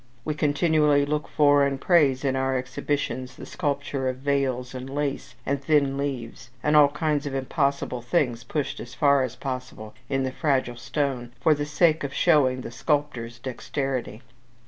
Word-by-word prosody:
We 155 - -1
continually 150 -1 +3
look 150 +1 -2
for, 145 -1 +4
and 140 -1 0
praise, 145 -6 +3
in 135 -1 +1
our 130 0 0
exhibitions 130 0 -3
the - - -9
sculpture 140 -3 -2
of 130 - -3
veils, 130 -2 -1
and 130 +1 -6
lace, 145 0 -3
and 140 0 -1
thin 140 -2 +2
leaves, 130 -5 -4
and 150 0 +2
all 150 -1 +8
kinds 150 0 -1
of 135 - -4
impossible 140 -2 -1
things 125 -2 0
pushed 150 -3 -3
as 125 +1 -9
far 140 -2 +4
as 130 -1 -2
possible 130 -5 -6 0.2
in 135 -1 0
the 130 - -2
fragile 130 -4 0
stone, 125 -2 -2
for 160 - +4
the 145 0 -3
sake 155 +1 +2
of 140 -1 -4
showing 135 -7 +3
the 115 - -7
sculptor's 125 -4 -2
dexterity. 130 -1 -4
140 Hz, 170 wpm, -25 LUFS, 130-145 Hz, 0.2 s, all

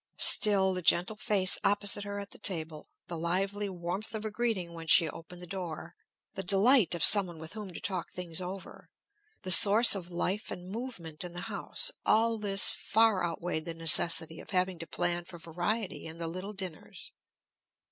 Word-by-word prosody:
Still 195 -3 +4
the 180 - -4
gentle 175 +5 +1
face 195 -3 +2
opposite 205 0 +2
her 200 0 -6
at 200 0 -8
the - - -12
table, 160 -4 -3 0.2
the 170 -2 -6
lively 195 +4 -2
warmth 185 +4 -6
of 220 0 -6
a 215 - -4
greeting 210 -7 -3
when 165 -1 -10
she 165 0 +6
opened 175 +3 -10
the - - -8
door, 175 -2 -7 0.4
the 195 - -5
delight 195 +2 +3
of 170 - -3
some 200 -2 +6
one 170 -2 -11
with 160 +2 -9
whom 210 -3 -8
to - - -8
talk 185 -4 -3
things 175 -1 -3
over, 185 +1 -9 0.5
the 185 - -1
source 210 +6 +7
of 185 -3 -4
life 185 +4 -4
and 180 +1 -8
movement 195 -10 -7
in 175 -1 -9
the 175 - -7
house; - - 0
all 225 0 +1
this 200 -2 +4
far 220 -3 +1
outweighed 170 -1 -4
the 165 - -6
necessity 165 0 +3
of - - -13
having 185 -2 -2
to 165 - -7
plan 175 0 -1
for 175 0 -11
variety 175 +5 -4
in 160 +1 -10
the 165 0 -5
little 185 +5 -7
dinners. 185 -5 -7
185 Hz, 190 wpm, -29 LUFS, 170-205 Hz, 0.5 s, source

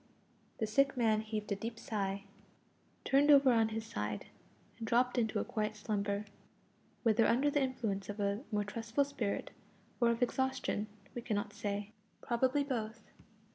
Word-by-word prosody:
The 220 - 0
sick 270 +5 +2
man 220 -3 +3
heaved 215 -1 -4
a - - +3
deep 225 +3 -5
sigh, 200 -3 -2 0.8
turned 280 +2 +4
over 275 -2 +8
on 225 -1 +3
his 220 0 -4
side, 105 - -3 0.5
and 225 - -4
dropped 245 +2 +3
into 230 -3 +1
a - - -1
quiet 215 0 -2
slumber 205 -1 -1 0.8
whether 225 -1 +4
under 265 +5 +3
the 290 - +2
influence 220 -7 -2
of 205 +1 -5
a 200 +2 0
more 210 -1 +1
trustful 225 +6 0
spirit 230 -7 -3 0.5
or 235 -2 +4
of 235 +1 +2
exhaustion 260 -4 0 0.3
we 240 - -4
cannot 205 -3 -2
say 205 0 -3 0.3
probably 260 +4 +1
both. 225 -5 -3
225 Hz, 155 wpm, -34 LUFS, 205-250 Hz, 0.8 s, over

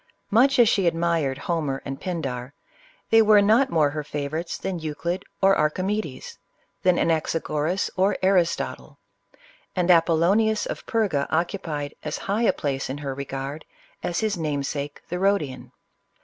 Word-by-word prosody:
Much 265 +6 +4
as 240 -2 +6
she 195 -3 +2
admired 165 -5 +1
Homer 150 -5 -2
and 135 0 -6
Pindar, 135 -7 -4 0.6
they 225 0 +7
were 215 -1 +6
not 220 +7 +4
more 150 - +2
her 150 0 -4
favor 145 +1 -3
ites 170 - -5
than 185 -3 -4
Euclid 170 +4 -3 0.2
or 195 0 +6
Archimedes, 185 -1 -2 0.4
than 180 -1 +3
Anaxagoras 160 +1 0
or<, 195 +2 +2
Aristotle; 180 -3 0 0.8
and 180 -1 +3
Apollonius 180 +6 +3
of - - -6
Perga 200 -12 0
occupied 160 -3 -2
as 150 0 -3
high 200 +3 0
a 235 - +4
place 135 -3 -3
in 135 - -3
her 140 -2 -4
regard, 140 +2 -5 0.4
as 170 - -2
his 210 -4 -1
namesake, 145 -1 -3
the 180 - -3
Rhodian. 190 -9 0
165 Hz, 145 wpm, -24 LUFS, 145-195 Hz, 0.8 s, they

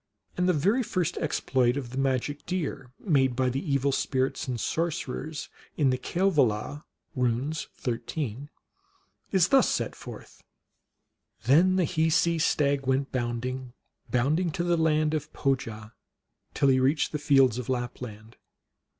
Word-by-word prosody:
And 180 0 +1
the - - +4
very 195 - +2
first 185 -8 -1
exploit 130 -4 +1
of 125 -4 -5
the 130 - -6
magic 135 +2 -1
deer, 150 -7 -3
made 135 - +2
by 130 0 +1
the 135 +3 -3
evil 140 0 +2
spirits 135 +2 -1
and 125 -2 -3
sorcerers 155 0 -3 0.3
in 140 -4 +3
the 130 - 0
Kalevala 145 - 0 0.3
(Runes 130 +5 -1
XIII.), 125 +1 -4 0.8
is - - +3
thus - - +5
set - - -1
forth: - - -11 0.5
" - - -41
Then 170 +9 +5
the 185 -2 +3
Hiisi 160 +2 +2
stag 140 -4 +1
went 135 +1 +1
bounding, 125 +1 -3 0.4
Bounding 150 +9 +1
to 175 - -1
the 175 0 +2
land 155 -1 +2
of 150 -1 -3
Pohja, 115 -6 -2 0.6
Till 140 - +3
he 130 -1 +4
reached 140 +3 +2
the 150 - -3
fields 135 -5 +4
of 125 - -6
Lapland. 120 -3 -5
140 Hz, 140 wpm, -27 LUFS, 125-155 Hz, 0.8 s, thus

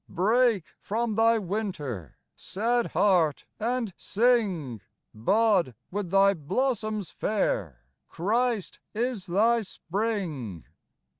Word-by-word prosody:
Break 215 +1 +2
from 225 +2 -1
thy 225 +2 +4
winter, 170 - -4 0.2
Sad 235 +4 0
heart, 175 -8 +3
and 230 -2 -1
sing! 195 - +1 0.2
* - - -54
Bud 190 - +2 0.2
with 200 -1 -3
thy 195 +1 +5
blossoms 215 - -1
fair: 90 - -1 0.3
Christ 225 +3 -1 0.2
is 235 -3 -2
thy 225 +6 +3
spring. 180 - -3
205 Hz, 95 wpm, -27 LUFS, 170-230 Hz, 0.3 s, thy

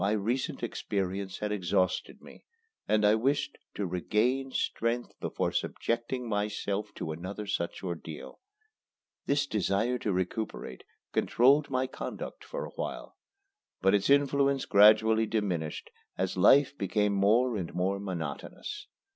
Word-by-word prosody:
My 100 +2 +2
recent 115 +5 -1
experience 95 -1 -3
had 105 0 -1
exhausted 90 -2 0
me, - - -14 0.4
and 105 -1 +3
I 105 - +6
wished 135 +6 0 0.2
to 100 - -2
regain 110 +9 0
strength 120 -1 -1
before - - -1
subjecting 120 +2 -2
myself 105 -1 -2
to 80 - -4
another 95 +6 -6
such 100 -4 -3
ordeal. 80 -4 -6 0.9
This 145 +1 +2
desire 110 +2 0
to 105 - -1
recuperate 95 +4 -3 0.3
controlled 140 +5 +4
my 130 -1 +1
conduct 130 - -6
for - - -5
a - - -9
while, - - -6 0.6
but 95 +1 +3
its 100 +3 +2
influence 140 -1 +3
gradually 110 +2 +6
diminished 90 -9 -2 0.3
as 95 -1 -1
life 140 +9 +5
became 105 -2 0
more 110 +5 +3
and 90 -5 -3
more 95 +2 0
monotonous. 95 - -5
105 Hz, 130 wpm, -30 LUFS, 95-125 Hz, 0.9 s, I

